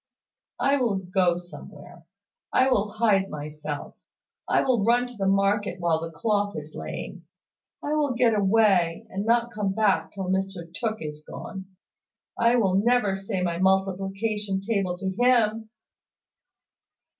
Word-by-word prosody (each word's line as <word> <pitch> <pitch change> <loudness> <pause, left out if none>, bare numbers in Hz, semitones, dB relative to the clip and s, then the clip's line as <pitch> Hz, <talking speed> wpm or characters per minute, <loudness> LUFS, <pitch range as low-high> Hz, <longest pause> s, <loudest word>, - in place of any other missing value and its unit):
"I 280 +1 +3
will 240 -6 +1
go 180 -2 +1
somewhere. 175 +1 -12 0.4
I 260 - +4
will 205 -3 +1
hide 210 -3 +2
myself. 150 0 -6 0.5
I - - +3
will 245 -6 +2
run 240 +3 +3
to 245 0 -10
the 195 -2 -1
market 195 -1 +1
while 165 -2 +1
the 165 - -4
cloth 205 +4 -1
is 155 0 -8
laying. - - -7 0.6
I 295 - -1
will 290 -4 +1
get 235 -1 +3
away, 195 -5 +3
and 200 +3 -3
not 235 0 +2
come 210 -3 -2
back 195 -6 +1
till 195 - -5
Mr 190 -3 -3
Tooke 220 -4 -3
is 150 0 -7
gone. 190 +3 -8 0.7
I 235 +1 +3
will 195 -5 +3
never 235 -5 +2
say 195 -1 -3
my 170 -1 -1
multiplication 195 +2 0
table 195 -3 -1
to 190 +1 -3
him!" 225 -3 +3
195 Hz, 145 wpm, -25 LUFS, 185-225 Hz, 0.7 s, I